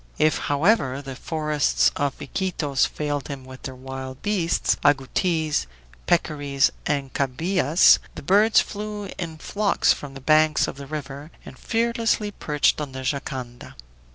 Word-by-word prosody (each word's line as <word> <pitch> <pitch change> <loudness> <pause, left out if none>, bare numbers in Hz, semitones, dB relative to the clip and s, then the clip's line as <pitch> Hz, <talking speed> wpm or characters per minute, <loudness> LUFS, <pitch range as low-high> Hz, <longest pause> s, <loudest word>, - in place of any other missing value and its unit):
If, 155 0 +2
however, 145 - +1
the 135 -2 -7
forests 150 0 +1
of 140 -1 -2
Iquitos 150 -5 -1
failed 145 -2 -3
him 140 -3 -7
with 130 0 -11
their 130 - -7
wild 130 0 -8
beasts, 195 -5 +1
agoutis, 150 - +1 0.4
peccaries, 145 -5 +2 0.2
and 140 -3 -1
cabiais, 160 +4 +3 0.2
the - - -8
birds 205 +7 +5
flew 210 -1 -4
in 165 -3 -5
flocks 200 +5 +1
from 140 -2 -9
the - - -7
banks 155 +2 +3
of - - -6
the 140 0 -9
river 145 0 -6 0.2
and - - -10
fearlessly 230 -2 0
perched 150 -5 +1
on 140 -3 -5
the 130 0 -6
jangada. 130 -3 -5
150 Hz, 140 wpm, -24 LUFS, 135-175 Hz, 0.4 s, birds